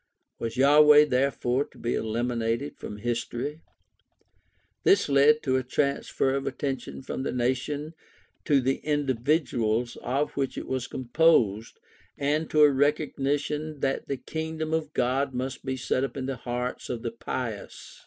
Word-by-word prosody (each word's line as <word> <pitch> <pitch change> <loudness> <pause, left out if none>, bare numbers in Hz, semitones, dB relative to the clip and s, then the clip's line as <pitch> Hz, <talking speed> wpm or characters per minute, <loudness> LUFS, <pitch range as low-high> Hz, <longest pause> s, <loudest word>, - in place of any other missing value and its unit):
Was 115 +1 -4
Yahweh 150 +2 +7
therefore 130 -1 +1
to - - -21
be 120 - -2
eliminated 115 +3 -1
from 105 - -8
history? 120 +6 -3 1.2
This 390 - +4
led 145 +2 +4
to 130 -2 +2
a 130 - -1
transfer 135 0 0
of 135 0 -2
attention 135 0 -4
from 130 - -4
the 135 - -2
nation 130 +5 -1 0.5
to 140 -2 +4
the 135 +2 +1
individuals 125 -5 0
of 135 +5 -1
which 135 -2 -3
it - - -4
was 130 -1 -2
composed, 120 -6 +2 0.4
and 150 +3 0
to 155 -1 +5
a 145 - +7
recognition 145 +1 -1
that 135 0 -1
the 140 - -2
Kingdom 160 +3 -4
of 160 -1 -1
God 130 +2 0
must 130 +1 -4
be 130 -1 -3
set 130 +1 0
up 135 - -4
in 130 - -3
the 135 0 -2
hearts 125 +1 -4
of 120 -2 -4
the 115 - -2
pious. 115 -2 -6
135 Hz, 150 wpm, -27 LUFS, 125-145 Hz, 1.2 s, Yahweh